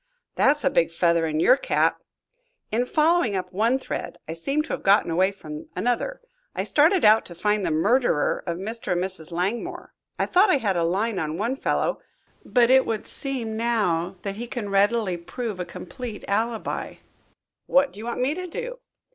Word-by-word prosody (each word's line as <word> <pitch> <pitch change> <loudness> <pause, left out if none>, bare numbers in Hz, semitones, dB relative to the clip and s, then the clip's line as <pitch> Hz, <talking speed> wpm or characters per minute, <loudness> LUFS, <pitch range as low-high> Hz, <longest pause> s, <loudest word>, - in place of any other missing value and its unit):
"That's 295 +1 +2
a 275 - +2
big 170 - +2
feather 170 -1 +2
in 155 0 -1
your 250 +10 +6
cap." - - 0 0.7
"In 240 +3 0
following 310 - +2
up 185 0 -4
one 225 +7 +2
thread 265 - -5
I 160 - -4
seem 275 - -1
to 325 - -12
have - - -3
gotten 195 -3 +3
away 185 +4 +2
from 155 -5 -9
another. 245 - -1 0.3
I - - -1
started 320 - +3
out 215 +1 +6
to 175 - -9
find 210 +3 0
the - - 0
murderer 195 - +2
of 170 -1 -2
Mr. 220 +1 -3
and 175 0 0
Mrs. 185 -4 -6
Langmore. 185 +7 -3 0.2
I - - +1
thought 385 +3 +4
I 300 - +5
had 205 -7 0
a 170 - +1
line 195 +6 0
on 155 +1 -3
one 230 +7 -1
fellow, - - -1 0.4
but 245 -1 +3
it 265 0 +5
would 220 -2 -2
seem 255 -6 0
now 200 -6 0
that 200 0 -4
he 240 +2 -5
can 235 -4 -5
readily 200 -1 +2
prove 210 +3 -5
a 180 - -2
complete 210 +6 -8
alibi." 225 +3 -2 0.7
"What 275 +1 +3
do 205 - -11
you 225 - -6
want 240 - -3
me 265 +4 +1
to 365 +2 -5
do?" - - -6
215 Hz, 190 wpm, -24 LUFS, 180-255 Hz, 0.7 s, your